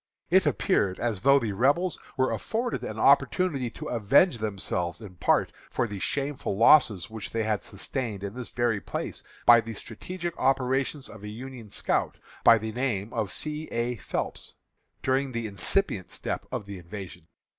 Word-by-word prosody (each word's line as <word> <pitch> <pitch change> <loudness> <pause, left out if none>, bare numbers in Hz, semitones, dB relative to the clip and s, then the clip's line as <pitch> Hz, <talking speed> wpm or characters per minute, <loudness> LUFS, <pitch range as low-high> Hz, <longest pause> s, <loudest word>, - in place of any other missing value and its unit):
It - - +5
appeared 95 -2 +1
as 115 -5 -1
though 140 +1 +6
the 115 -6 0
Rebels 145 - +2 0.2
were 130 0 +2
afforded 235 +2 -2
an - - -5
opportunity 145 -10 +3
to - - -9
avenge 120 - +4
themselves 95 -4 -2
in 105 -5 -10
part - - +2 0.2
for - - 0
the 100 -2 -6
shameful 135 - -2
losses 115 - +5
which 110 -2 -6
they 115 -1 -1
had 110 -2 0
sustained 100 +1 -4
in 100 0 -4
this 125 0 -7
very 120 -4 0
place - - -4 0.2
by 120 -1 +8
the 115 0 -7
strategic 175 - -6
operations 135 +1 +1
of 110 - -12
a 105 - -7
Union 120 0 -8
scout, - - -1 0.3
by 115 - +8
the 110 0 -4
name 115 -4 -2
of 105 -3 -1
C. 155 0 -4
A. 120 +1 -1
Phelps, - - -4 0.5
during 130 0 +1
the 115 -1 -2
incipient 100 - 0
step - - -4
of 125 -5 -3
the 100 -2 -7
invasion. 90 -2 -9
115 Hz, 165 wpm, -27 LUFS, 100-135 Hz, 0.5 s, by